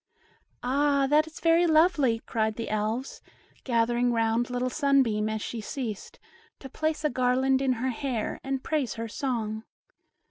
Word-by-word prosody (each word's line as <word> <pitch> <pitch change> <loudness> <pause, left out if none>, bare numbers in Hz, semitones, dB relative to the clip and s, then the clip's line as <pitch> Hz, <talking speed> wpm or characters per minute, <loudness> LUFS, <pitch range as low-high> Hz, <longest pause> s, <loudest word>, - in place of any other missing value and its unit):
"Ah, 280 +2 +2
that 305 +1 +4
is 320 - -11
very 335 +1 +4
lovely," 310 -8 +3
cried 220 -1 -1
the 230 - -5
Elves, 215 +5 -2 0.4
gathering 240 0 +1
round 230 +1 +1
little 250 0 -2
Sunbeam 260 -8 +2
as 220 -1 -3
she 230 - -5
ceased, 225 -3 -6 0.4
to 270 - -10
place 310 +3 -2
a - - +3
garland 260 +2 +2
in 265 -1 +2
her 255 +2 -2
hair 245 -2 -3
and 270 -1 -3
praise 300 -6 -1
her 230 0 -4
song. 220 -3 -3
250 Hz, 150 wpm, -27 LUFS, 225-280 Hz, 0.4 s, that